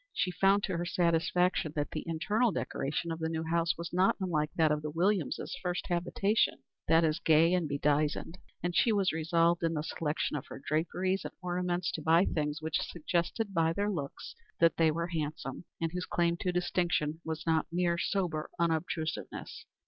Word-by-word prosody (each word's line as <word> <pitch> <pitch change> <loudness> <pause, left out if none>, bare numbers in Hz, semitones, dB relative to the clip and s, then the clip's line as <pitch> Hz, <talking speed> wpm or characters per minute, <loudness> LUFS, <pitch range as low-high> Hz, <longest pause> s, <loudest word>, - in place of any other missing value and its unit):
She 180 - 0
found 195 +2 +3
to 185 -3 -1
her 170 - -1
satisfaction 170 -1 +1
that 145 -1 -2
the - - -4
internal 210 +8 +1
decoration 160 0 -2
of 165 - -4
the 160 0 -1
new 160 0 -2
house 170 +1 +1
was 170 0 -6
not 185 +2 +4
unlike 160 -5 0
that 160 -2 +3
of 150 0 0
the 150 - -4
Williamses' 175 +1 0
first 180 -1 -2
habitation 185 +5 +1 0.2
that 165 +1 +5
is, 155 0 +1
gay 165 +2 +4
and 175 -4 +1
bedizened; 150 +4 0 0.2
and 175 -1 -1
she 235 - +4
was 200 -3 +2
resolved 165 +1 +2
in 165 -1 0
the 150 - -1
selection 155 -1 -2
of 140 - -5
her - - -8
draperies 180 +6 -1
and - - -7
ornaments 180 -1 -1
to 160 - -4
buy 165 +4 +4
things 150 0 -2
which 160 0 0
suggested 175 +5 -2
by 165 -2 +2
their 205 +3 0
looks 145 -7 -5 0.3
that 165 -1 +4
they 165 -1 +4
were 170 +2 -2
handsome, 155 -2 -4
and 165 -1 -1
whose 180 +1 -4
claim 170 0 +1
to 180 - -1
distinction 175 -3 0
was 160 0 -4
not 160 -1 +2
mere 170 0 +1
sober 170 -6 -1
unobtrusiveness. 165 -1 -2
170 Hz, 185 wpm, -31 LUFS, 160-180 Hz, 0.3 s, that